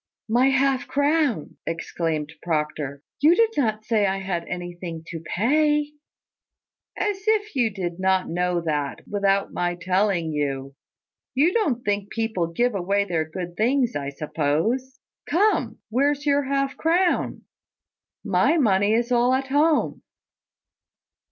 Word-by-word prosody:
"My 240 +4 +3
half 270 0 +1
crown!" 285 - 0
exclaimed 165 -2 -3
Proctor. 150 -3 -2 0.2
"You 315 +4 +5
did 455 +2 +3
not 215 -5 0
say 215 -3 +2
I 195 0 0
had 185 -3 -3
anything 175 -2 -6
to 165 - -5
pay." 295 - +1 1.1
"As 410 -2 -1
if 425 -4 +1
you 240 -4 +2
did 180 -4 -5
not 190 0 +2
know 180 0 0
that, 150 -4 -3
without 200 -1 +1
my 175 0 -1
telling 185 -2 0
you! 140 -2 -2 0.6
You 310 +7 +3
don't 290 - 0
think 205 -1 -1
people 220 -7 -1
give 240 +9 0
away 200 +1 0
their 160 -4 -2
good 175 +1 -6
things, 245 +3 +1
I 140 -1 -2
suppose! 160 - -1 0.3
Come, 340 - +2
where's 285 +4 +1
your 285 -1 +2
half 275 0 -1
crown? 345 +2 +1 0.8
My 335 - +3
money 205 -6 +3
is 240 +2 0
all 245 +1 +4
at 270 0 -2
home." 300 +3 +2
210 Hz, 130 wpm, -24 LUFS, 175-275 Hz, 1.1 s, You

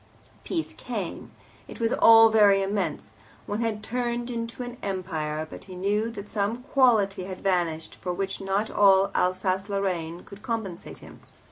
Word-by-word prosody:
Peace 330 -3 -3
came - - -6 0.4
it - - -10
was 230 0 +1
all 225 0 +8
very 205 -3 +5
immense, 195 -6 -2 0.3
one 210 +2 -3
had 220 -2 -2
turned 240 0 -2
into 230 +1 -4
an 245 0 -8
Empire 160 -5 -3
but - - -11
he 185 - -10
knew 205 +4 0
that 205 -3 -8
some 220 +3 -2
quality 220 -9 +2
had 185 -1 -7
vanished 175 -4 -1
for 180 - -5
which 195 +2 -3
not 195 +3 -1
all 195 -1 +5
Alsace 185 +2 0
Lorraine 180 -4 -2
could 200 0 -13
compensate 220 -8 -5
him. - - -14
200 Hz, 155 wpm, -26 LUFS, 185-225 Hz, 0.4 s, all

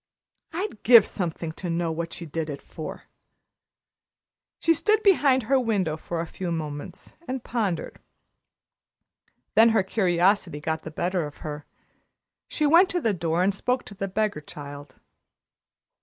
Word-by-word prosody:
I'd 350 - -4
give 230 -2 +8
something 170 -3 -3
to 175 +2 -6
know 170 0 0
what 165 +1 -4
she 170 - -6
did 160 0 -4
it 140 - -5
for." - - -8 1.5
She 330 - +3
stood 430 +6 +2
behind 285 - +4
her 265 +4 +3
window 200 -10 0
for 165 +1 -5
a - - -3
few 175 +1 -5
moments 150 -3 -6
and 255 -1 -4
pondered. 205 -9 -2 1.5
Then 225 +1 +7
her 220 -3 +3
curiosity 185 -4 +1
got 160 +1 -2
the 155 - -7
better 175 +1 -1
of 145 - -12
her. 150 -1 -6 0.8
She 305 - -1
went 335 +6 +6
to 355 - 0
the 225 -10 +1
door 170 -1 0
and 195 +2 +2
spoke 250 +6 -1
to - - -11
the 195 0 -4
beggar 205 -4 -1
child. 145 -3 -10
185 Hz, 150 wpm, -25 LUFS, 160-230 Hz, 1.5 s, give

